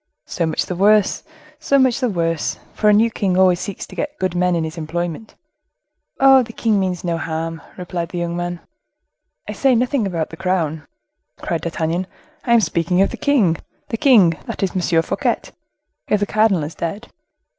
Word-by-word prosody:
"So 170 Hz, -3 st, -2 dB
much 160 Hz, -, -1 dB
the 180 Hz, -, -4 dB
worse! 205 Hz, +2 st, +3 dB, 0.4 s
so 280 Hz, -3 st, +2 dB
much 260 Hz, -2 st, +3 dB
the 250 Hz, -3 st, 0 dB
worse! 165 Hz, -4 st, -1 dB, 0.2 s
for 210 Hz, -, +2 dB
a -, -, +6 dB
new 225 Hz, +2 st, +4 dB
king 190 Hz, -4 st, 0 dB
always 185 Hz, -2 st, +4 dB
seeks 200 Hz, -1 st, -5 dB
to -, -, -13 dB
get 295 Hz, 0 st, -4 dB
good 185 Hz, -2 st, -1 dB
men 180 Hz, 0 st, +1 dB
in 165 Hz, -, 0 dB
his 160 Hz, 0 st, -5 dB
employment." 170 Hz, +4 st, -4 dB, 0.8 s
"Oh! 270 Hz, -1 st, +7 dB
the 230 Hz, -2 st, -7 dB
king 220 Hz, -3 st, +1 dB
means 185 Hz, -2 st, -2 dB
no 170 Hz, -2 st, -1 dB
harm," 165 Hz, 0 st, -4 dB, 0.2 s
replied 175 Hz, -2 st, -4 dB
the 175 Hz, -, -6 dB
young 170 Hz, 0 st, -2 dB
man. 175 Hz, 0 st, -4 dB, 0.9 s
"I -, -, -4 dB
say 270 Hz, -2 st, +2 dB
nothing 245 Hz, -2 st, +1 dB
about 165 Hz, -4 st, -3 dB
the 160 Hz, -, -9 dB
crown," 160 Hz, -5 st, -1 dB, 0.5 s
cried 165 Hz, -, -3 dB
D'Artagnan; 170 Hz, +2 st, -2 dB, 0.4 s
"I 235 Hz, -, +3 dB
am 230 Hz, -, +5 dB
speaking 170 Hz, 0 st, 0 dB
of -, -, -1 dB
the -, -, -6 dB
king—the 225 Hz, -, -1 dB
king, 200 Hz, -, +5 dB
that -, -, -4 dB
is 190 Hz, -, 0 dB
M. 175 Hz, -3 st, +1 dB
Fouquet, -, -, -1 dB, 0.7 s
if 210 Hz, -, +2 dB
the 205 Hz, -, +1 dB
cardinal 215 Hz, -5 st, +2 dB
is 150 Hz, +2 st, -5 dB
dead. 200 Hz, +8 st, -5 dB
180 Hz, 190 wpm, -20 LUFS, 165-215 Hz, 0.9 s, Oh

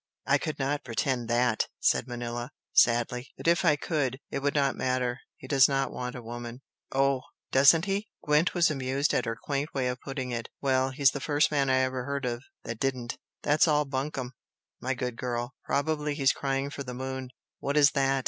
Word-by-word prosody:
"I 140 Hz, +1 st, +3 dB
could 155 Hz, +1 st, -3 dB
not 145 Hz, +2 st, -1 dB
pretend 120 Hz, 0 st, -1 dB
THAT!" 120 Hz, -1 st, +2 dB
said -, -, +2 dB
Manella, 120 Hz, 0 st, -4 dB, 0.2 s
sadly 120 Hz, +2 st, +3 dB
"But -, -, -5 dB
if 170 Hz, +2 st, +4 dB
I 155 Hz, -4 st, +5 dB
could, 140 Hz, -4 st, -1 dB
it -, -, -1 dB
would 140 Hz, +1 st, 0 dB
not 140 Hz, -2 st, +2 dB
matter. 125 Hz, -1 st, -1 dB, 0.2 s
He -, -, -11 dB
does 135 Hz, -3 st, +6 dB
not 135 Hz, -1 st, 0 dB
want 125 Hz, 0 st, -5 dB
a 125 Hz, -, -7 dB
woman." 120 Hz, +2 st, -7 dB, 0.3 s
"Oh, 135 Hz, -1 st, +2 dB, 0.3 s
doesn't 140 Hz, +6 st, +6 dB
he?" 200 Hz, +2 st, -2 dB
Gwent 150 Hz, +5 st, +2 dB
was 170 Hz, -3 st, +4 dB
amused 135 Hz, +1 st, 0 dB
at -, -, +1 dB
her 115 Hz, 0 st, -3 dB
quaint 145 Hz, +2 st, -3 dB
way 130 Hz, -2 st, +1 dB
of 125 Hz, 0 st, -4 dB
putting 130 Hz, -2 st, -4 dB
it. 115 Hz, -1 st, -4 dB
"Well, 130 Hz, -1 st, +2 dB
he's 135 Hz, 0 st, +3 dB
the 145 Hz, -, -4 dB
first 145 Hz, +1 st, +2 dB
man 140 Hz, -2 st, +2 dB
I 130 Hz, 0 st, +4 dB
ever 130 Hz, -1 st, -1 dB
heard 140 Hz, 0 st, -2 dB
of, 120 Hz, -1 st, -2 dB, 0.2 s
that 115 Hz, -1 st, -5 dB
didn't! 125 Hz, -3 st, -2 dB, 0.2 s
That's 150 Hz, +3 st, +4 dB
all 150 Hz, -1 st, +3 dB
bunkum, 135 Hz, -2 st, -3 dB, 0.5 s
my 130 Hz, +1 st, -1 dB
good 125 Hz, -1 st, -3 dB
girl! 120 Hz, 0 st, -3 dB
Probably 150 Hz, 0 st, 0 dB
he's 135 Hz, -2 st, +3 dB
crying 135 Hz, 0 st, -2 dB
for 140 Hz, -, -6 dB
the 125 Hz, -2 st, -6 dB
moon!" 130 Hz, 0 st, -4 dB, 0.3 s
"What 140 Hz, +2 st, -1 dB
is 145 Hz, -1 st, +7 dB
that?" 135 Hz, -1 st, +2 dB
135 Hz, 200 wpm, -28 LUFS, 125-145 Hz, 0.5 s, is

